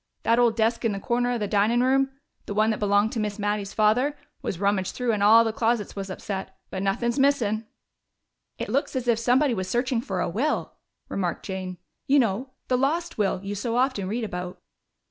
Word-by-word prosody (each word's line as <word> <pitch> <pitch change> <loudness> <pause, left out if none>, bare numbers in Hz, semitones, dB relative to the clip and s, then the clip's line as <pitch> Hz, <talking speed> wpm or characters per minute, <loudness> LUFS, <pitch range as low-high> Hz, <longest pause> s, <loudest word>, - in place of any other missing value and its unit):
That 230 +1 +3
old 235 -2 +4
desk 230 +1 +1
in 225 -3 +1
the 195 - -4
corner 245 +4 0
of 240 - -1
the 210 - 0
dinin' 215 +4 +2
room 270 +1 +3 0.4
the 205 - -4
one 215 +1 +3
that 215 - -2
belonged 205 +1 +2
to 230 - -3
Miss 210 -1 -2
Mattie's 205 -1 -2
father 245 +7 +2 0.2
was 175 - -4
rummaged 200 -2 0
through, 250 -2 0
and 210 -2 -1
all 220 +3 +7
the 225 -1 -1
closets 225 -2 0
was 195 -1 -5
upset. 190 0 -5
But 190 - -3
nuthin's 235 +6 0
missin'!" 230 -6 +2 0.9
"It - - -4
looks 275 +1 0
as 255 -1 -2
if 230 -2 +3
somebody 250 +3 +3
were 185 - -2
searching 240 +5 0
for 195 -5 -3
a - - 0
will," 250 - -1 0.3
remarked 180 -3 -3
Jane. 185 -2 -5 0.3
"You 280 - +5
know 240 +1 +1 0.2
'the 250 -1 +1
lost 310 +1 -1
will' 195 -2 +1
you 200 +1 -4
so 230 +4 -2
often 250 -7 +1
read 225 +4 -2
about." 180 -3 -5
220 Hz, 205 wpm, -25 LUFS, 200-245 Hz, 0.9 s, all